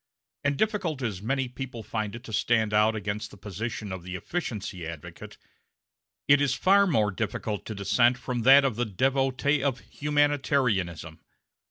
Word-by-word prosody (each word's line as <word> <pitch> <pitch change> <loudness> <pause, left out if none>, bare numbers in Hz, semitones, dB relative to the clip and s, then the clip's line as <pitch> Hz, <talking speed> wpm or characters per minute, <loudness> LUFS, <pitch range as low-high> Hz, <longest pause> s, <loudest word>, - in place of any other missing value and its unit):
And, 145 -1 +1
difficult 185 - -1
as 105 -6 -3
many 135 +4 -1
people 125 -2 -7
find 110 0 -3
it 120 - -9
to 110 - -9
stand 110 0 +1
out 105 +1 +4
against 105 0 -4
the - - -14
position 105 +2 -5
of 95 -1 -5
the 90 +1 -7
efficiency 95 - -4
advocate, 80 -3 -9 0.9
it 145 0 +6
is 145 - +2
far 200 +2 +4
more 110 - +2
difficult 105 +1 -3
to 110 - -5
dissent 120 +5 +3
from 125 -1 -3
that 135 +4 +7
of 125 -5 -1
the 120 - +1
devotee 135 +6 +1
of 135 -3 0
humanitarianism. 135 - 0
120 Hz, 160 wpm, -27 LUFS, 105-140 Hz, 0.9 s, that